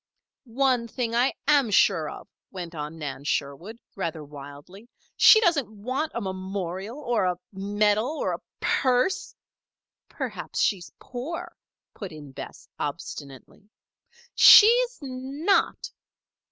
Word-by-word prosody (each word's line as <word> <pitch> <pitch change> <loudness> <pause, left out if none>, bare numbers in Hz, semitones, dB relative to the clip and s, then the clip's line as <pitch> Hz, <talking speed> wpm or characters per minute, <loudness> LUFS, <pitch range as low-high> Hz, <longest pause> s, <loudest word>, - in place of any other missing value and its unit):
"One 250 -1 +1
thing 230 0 -3
I 245 +3 +3 0.2
am 285 -5 +4
sure 185 -6 +3
of," - - -10 0.2
went 175 -3 -7
on 150 0 -6
Nan 140 -3 -6
Sherwood, 145 +10 -3 0.2
rather 165 -5 -4
wildly. 145 +9 -12 0.3
"She 435 - +8
doesn't 330 - +2
want 255 +9 -4
a 235 - -2
memorial 190 +2 -5
or 240 -9 0
a 180 -1 0 0.2
medal 205 +4 +1
or - - -1
a - - -6 0.2
purse 255 +8 0 0.4
" - - -64
"Perhaps - - -5
she's 185 -5 0
poor," 335 +8 -7 0.4
put 195 -4 -8
in 150 -3 -11
Bess, - - -10
obstinately. 140 +8 -7 0.6
"She's 485 +3 +7
not!" 275 +8 -1
210 Hz, 120 wpm, -25 LUFS, 175-260 Hz, 0.6 s, She